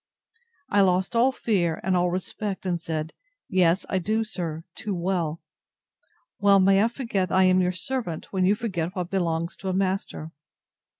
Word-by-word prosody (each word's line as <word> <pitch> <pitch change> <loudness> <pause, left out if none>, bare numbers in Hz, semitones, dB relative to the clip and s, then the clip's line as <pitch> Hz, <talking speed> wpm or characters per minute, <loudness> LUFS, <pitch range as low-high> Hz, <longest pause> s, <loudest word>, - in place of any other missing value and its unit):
I 205 - +4
lost 190 +3 +2
all 245 +3 +4
fear, 180 -10 0
and 190 0 +1
all 180 0 +2
respect, 190 +2 -3
and 175 -2 -1
said, 160 -1 -3 0.3
Yes, 185 -2 +2
I 190 - 0
do, 215 +5 0
sir, 165 -7 -5
too 215 -1 -4
well!—Well 185 - -2
may 195 +1 +5
I - - +4
forget 230 -7 -2
that - - +1
I 190 - +6
am 185 0 +4
your 180 0 +2
servant, 185 -2 -4
when 190 -1 +1
you 195 +3 +4
forget 185 -6 -3
what 180 -1 -3
belongs 170 -3 -1
to 190 - -4
a - - 0
master. 185 -4 -2
185 Hz, 170 wpm, -25 LUFS, 175-200 Hz, 0.3 s, I